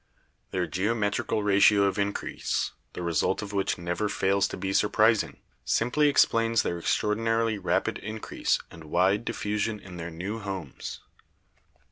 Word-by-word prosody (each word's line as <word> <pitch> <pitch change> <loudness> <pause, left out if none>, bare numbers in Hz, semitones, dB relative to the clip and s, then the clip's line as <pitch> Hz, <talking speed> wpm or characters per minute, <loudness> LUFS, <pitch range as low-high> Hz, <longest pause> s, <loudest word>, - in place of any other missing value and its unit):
Their 90 -1 -1
geometrical 105 +4 0
ratio 100 0 +5
of 100 +1 +1
increase, 100 0 -1 0.2
the 90 - -5
result 85 +4 0
of 105 0 -7
which 100 -1 0
never 90 +4 -2
fails 100 0 +2
to - - -6
be 95 0 -2
surprising, 110 +2 +3 0.3
simply 145 +6 +2
ex 145 - +6
plains 115 0 +1
their 85 - -2
extraordinarily 115 +3 +1
rapid 95 - 0
increase 110 +1 -1
and 80 -2 -12
wide 95 +7 +2
diffu 105 0 -2
sion 105 0 -1
in 95 -3 -11
their 85 0 -5
new 95 +7 -5
homes. 95 -9 -6
100 Hz, 145 wpm, -27 LUFS, 95-110 Hz, 0.3 s, ex